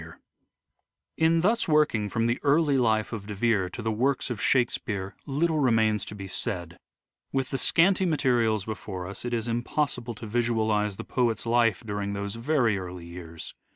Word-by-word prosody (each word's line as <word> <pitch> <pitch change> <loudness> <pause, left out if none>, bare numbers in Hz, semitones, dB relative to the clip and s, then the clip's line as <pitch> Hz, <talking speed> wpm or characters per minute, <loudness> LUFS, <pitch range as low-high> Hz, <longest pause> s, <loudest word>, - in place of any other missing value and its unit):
Early - - -10
poetry - - -21 1.0
In 165 0 +4
thus 220 +6 +2
working 150 -10 +2
from 115 +1 0
the 120 +1 0
early 145 -1 +3
life 110 -2 +1
of 105 -2 -6
De 105 - -5
Vere 105 -3 +1
to 115 - -7
the 110 - 0
works 130 +4 0
of 110 -4 -4
Shakespeare 105 -5 0
little 155 +3 +1
remains 110 -5 +3
to 105 - -8
be 100 -1 -7
said. 85 -3 -4 0.5
With 135 -1 -1
the 135 - -1
scanty 185 +2 +4
materials 120 - +1
before 100 -4 -5
us 95 +6 -7
it 120 - -2
is 115 0 -2
impossible 120 0 -1
to 110 - -8
visualise 110 -2 0
the - - -6
poet's 120 -3 0
life 115 -1 +2
during 100 -1 -3
those 100 0 -3
very 115 -4 +1
early 90 -2 -7
years. 85 -2 -8
115 Hz, 180 wpm, -27 LUFS, 105-130 Hz, 1.0 s, In